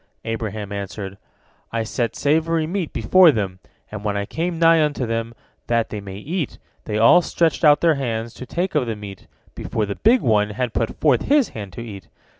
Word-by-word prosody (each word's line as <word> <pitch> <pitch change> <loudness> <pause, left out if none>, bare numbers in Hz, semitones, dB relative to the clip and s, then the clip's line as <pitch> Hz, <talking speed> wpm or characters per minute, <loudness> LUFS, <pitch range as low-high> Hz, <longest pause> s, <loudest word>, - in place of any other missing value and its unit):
Abraham 110 -2 -4
answered: 100 -1 -6 0.5
"I 115 -1 -1
set 115 0 -2
savory 160 +2 +1
meat 175 0 -3
before 185 -3 +5
them, 95 -7 -3 0.3
and 105 -1 -6
when 100 -1 -1
I 100 - -2
came 170 - -3
nigh 165 -1 +5
unto 145 -4 -1
them, 115 0 -3 0.3
that 115 -1 +1
they 105 - -5
might 100 +1 -9
eat, 165 -2 -3 0.3
they 105 - -2
all 115 +10 +6
stretched 165 -1 0
out 145 -2 +6
their 165 -1 +4
hands 115 -5 -3
to 130 - -9
take 180 +6 -2
of 145 -5 +1
the 115 - -2
meat, 100 -2 -10 0.3
before 110 - -2
the 100 - -3
big 235 +3 +4
one 105 -3 +2
had 125 -3 -1
put 115 - -2
forth 140 -6 +3
his 285 -2 +3
hand 100 -4 -8
to 120 - -7
eat. 100 -6 -9
115 Hz, 200 wpm, -21 LUFS, 105-160 Hz, 0.5 s, all